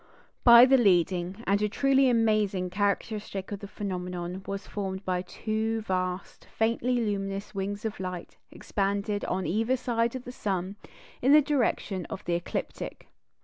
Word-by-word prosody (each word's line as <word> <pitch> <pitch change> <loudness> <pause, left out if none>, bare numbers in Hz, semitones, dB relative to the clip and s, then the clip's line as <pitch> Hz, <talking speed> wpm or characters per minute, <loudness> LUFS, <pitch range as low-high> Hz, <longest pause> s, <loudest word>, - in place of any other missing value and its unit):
But 240 +1 +9
the 265 - +7
leading, 185 0 +2
and 200 +1 +2
a 210 - +1
truly 270 +3 +3
amazing, 215 -6 +1
characteristic 205 0 -2
of 205 - -4
the 200 - -8
phenomenon 180 -2 -5
was 195 0 -4
formed 190 -1 -5
by 180 -1 0
two 220 +4 -2
vast, 185 -2 -3
faintly 230 +3 +1
luminous 200 -2 -3
wings 200 +2 -4
of 220 - -3
light, 180 -2 -6 0.2
expanded 200 +1 -2
on 185 0 -2
either 225 +7 +1
side 235 0 0
of 255 - -5
the 250 - -7
sun 195 -5 -3 0.5
in 265 +3 +5
the 305 - +9
direction 235 - 0
of 195 - -7
the 175 - 0
ecliptic. 170 0 -4
200 Hz, 150 wpm, -28 LUFS, 185-225 Hz, 0.5 s, But